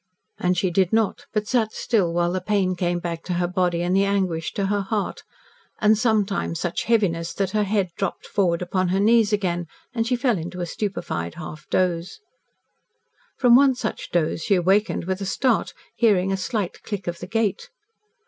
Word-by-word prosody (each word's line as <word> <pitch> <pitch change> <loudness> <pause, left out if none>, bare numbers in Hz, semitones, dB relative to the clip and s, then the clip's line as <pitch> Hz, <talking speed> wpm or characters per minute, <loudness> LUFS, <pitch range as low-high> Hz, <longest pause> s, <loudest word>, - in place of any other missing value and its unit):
And 180 0 +1
she 180 +1 +1
did 185 0 +2
not, 220 -2 0
but 210 -1 -1
sat 225 -3 +1
still, 200 -8 +1
while 175 0 +1
the 185 0 -2
pain 190 -2 +1
came 175 0 0
back 170 -1 -4
to 180 - -2
her 175 0 0
body 180 -1 0
and 180 +1 +1
the 195 - +4
anguish 185 -5 0
to 200 - -1
her 205 +1 0
heart 205 +1 -2 0.6
and 215 0 +5
sometimes 210 -6 0
such 175 -1 -2
heaviness 190 -8 +1
that 195 -2 -1
her 210 0 +1
head 195 -3 0
dropped 195 -3 -3
forward 180 -3 +1
upon 185 +1 0
her 190 +2 +1
knees 220 +1 +4
again, 175 -4 -1 0.3
and 230 -2 -1
she 250 - +2
fell 240 -5 +1
into 180 +3 -6
a 175 - -1
stupefied 170 - -4
half 155 -2 -9
doze. 180 -1 0 1.2
From 245 -2 +6
one 270 0 +5
such 235 -3 -4
doze 165 -1 0
she 200 - +3
awakened 190 +2 +2
with 190 +1 -2
a - - -2
start, 245 +3 +1 0.2
hearing 195 -5 +3
a - - +1
slight 190 0 -3
click 200 -4 -5
of 175 0 -4
the 180 - -7
gate. 215 -2 -1
190 Hz, 190 wpm, -23 LUFS, 175-210 Hz, 1.2 s, From